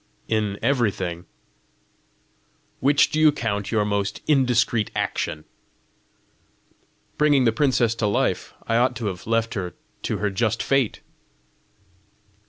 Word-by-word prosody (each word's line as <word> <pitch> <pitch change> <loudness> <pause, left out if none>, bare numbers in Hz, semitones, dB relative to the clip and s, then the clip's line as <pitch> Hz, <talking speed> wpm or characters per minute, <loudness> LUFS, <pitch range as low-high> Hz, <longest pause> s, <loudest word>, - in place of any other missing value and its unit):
"In 105 -2 -1
everything." 100 -9 0 1.5
"Which 140 +2 +3
do 155 - 0
you 155 -1 +6
count 105 -7 -3
your 105 -2 +2
most 100 -1 -1
indiscreet 120 -6 +2
action?" 75 0 -2 1.8
"Bringing 145 -3 +4
the 115 - +4
princess 120 -2 +2
to 105 - +2
life: 100 - 0
I 115 - +1
ought 125 +1 +2
to 115 -1 -5
have 95 -2 -5
left 115 0 0
her 90 -5 -4 0.3
to - - -2
her 105 -1 -1
just 115 +3 0
fate." 135 -5 +1
115 Hz, 120 wpm, -23 LUFS, 100-125 Hz, 1.8 s, you